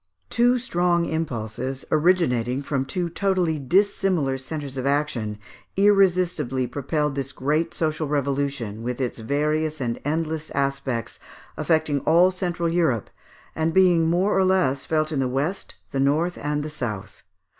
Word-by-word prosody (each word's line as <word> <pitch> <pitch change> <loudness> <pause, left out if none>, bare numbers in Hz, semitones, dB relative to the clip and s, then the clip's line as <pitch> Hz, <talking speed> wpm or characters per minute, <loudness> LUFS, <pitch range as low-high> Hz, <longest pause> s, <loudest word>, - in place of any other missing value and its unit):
Two 245 +1 +4
strong 175 -8 +1
impulses, 130 -4 -3
originating 145 -7 +2
from 135 -1 -1
two 175 +6 -2
totally 175 -3 0
dissimilar 180 -2 +1
centres 140 +1 -6
of 130 0 -2
action, 135 -7 -1 0.4
irresistibly 180 -10 +3
propelled 145 +3 -1
this 135 0 -3
great 150 +5 0
social 155 -1 -1
revolution, 140 -6 -2
with 125 +2 -3
its 125 -2 -2
various 150 +5 -1
and 120 -3 -2
endless 155 +1 -2
aspects, 140 -4 -2 0.4
affecting 155 -3 +1
all 170 +6 +4
central 175 -2 -2
Europe, 165 - 0 0.4
and 160 +1 0
being 175 -3 +5
more 180 +4 +2
or 190 - +4
less 185 -8 +2
felt 155 -1 +1
in 145 - -1
the 130 - +1
west, 140 +9 -2 0.2
the 135 - -2
north, 155 +6 +2
and 150 0 -1
the 155 - -5
south. 115 -9 -5
150 Hz, 140 wpm, -24 LUFS, 135-170 Hz, 0.4 s, being